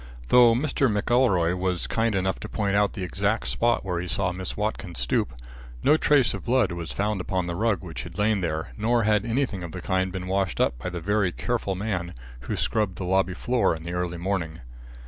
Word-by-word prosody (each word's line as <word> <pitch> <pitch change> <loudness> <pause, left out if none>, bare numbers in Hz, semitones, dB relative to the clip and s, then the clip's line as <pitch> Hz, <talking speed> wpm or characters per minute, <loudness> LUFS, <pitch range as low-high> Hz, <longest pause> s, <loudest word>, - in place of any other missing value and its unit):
Though 120 -2 +7
Mr. 135 +1 +1
McElroy 105 -5 +2
was 90 -1 -1
kind 115 -2 0
enough 95 0 0
to - - -7
point 100 -2 0
out 100 0 +2
the 95 - -5
exact 65 -6 -1
spot 120 - +1
where 90 -2 -1
he 90 - -5
saw 90 +2 +1
Miss 95 +1 -5
Watkins 105 -5 -3
stoop, - - 0 0.5
no 150 - +6
trace 145 -4 +3
of - - -6
blood 120 -5 +2
was 85 -1 -5
found 105 -1 -1
upon 90 -1 -1
the 85 - -3
rug 105 +2 0
which 85 -3 -6
had 85 0 -10
lain 105 -1 +2
there, 80 -2 -3
nor 115 +2 +1
had 105 +1 +2
anything 115 -5 -1
of 85 -2 -7
the 90 - -5
kind 95 +1 0
been 90 -1 -5
washed 95 -7 -1
up - - +2
by 80 - -4
the 90 -1 -5
very 100 0 +1
careful 110 -2 -2
man 90 -4 -3 0.2
who - - -4
scrubbed 105 -5 0
the 95 - -5
lobby 95 0 +1
floor 120 -6 +1
in 80 - -9
the 85 +1 -5
early 90 -1 -2
morning. 85 -3 -3
95 Hz, 215 wpm, -25 LUFS, 90-110 Hz, 0.5 s, Though